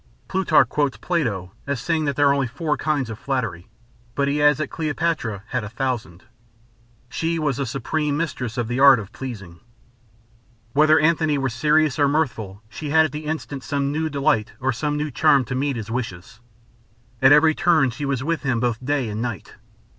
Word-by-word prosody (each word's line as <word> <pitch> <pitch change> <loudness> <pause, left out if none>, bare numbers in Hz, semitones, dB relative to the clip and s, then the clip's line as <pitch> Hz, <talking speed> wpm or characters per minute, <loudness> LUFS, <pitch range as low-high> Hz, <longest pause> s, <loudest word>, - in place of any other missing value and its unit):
Plutarch 170 -8 +3
quotes 145 +1 -1
Plato 110 - -2 0.2
as 140 -3 -1
saying 160 +1 -1
that 140 -1 -1
there 145 0 +4
are 140 -2 0
four 150 +6 -2
kinds 145 -7 -1
of 110 - -8
flattery, 115 -11 -3 0.5
but 140 0 +1
he 145 +1 0
adds 150 -1 +5
that 155 - -4
Cleopatra 155 - -2
had 125 -3 -2
a 105 - -6
thousand. 115 -7 -4 0.8
She 165 +6 -2
was 150 -5 -1
the 140 -2 -2
supreme 145 +4 -2
mistress 130 -8 -3
of 120 -2 -1
the 120 +2 -2
art 135 -1 +8
of 105 -2 -7
pleasing. 100 -10 -8 1.1
Whether 155 +2 +5
Antony 160 -2 +2
were 135 -1 0
serious 150 +4 +2
or 145 - +4
mirthful, 120 -9 -2
she 145 +7 -7
had 160 +1 +5
at 155 - -4
the 150 +2 -6
instant 150 -3 -4
some 140 -1 -1
new 160 +2 -1
delight 135 -7 0
or 130 0 0
some 150 +4 -2
new 150 0 -2
charm 140 0 +3
to 120 - -5
meet 135 +1 -1
his 115 -1 -6
wishes. 115 -2 -5 0.8
At 130 +1 +6
every 155 +2 +6
turn 155 -6 +3
she 135 +5 -5
was 135 -2 -1
with 165 0 -1
him 130 -5 0
both 120 0 -1
day 140 -2 0
and 105 +1 -4
night. 115 -7 -5
140 Hz, 190 wpm, -22 LUFS, 120-150 Hz, 1.1 s, art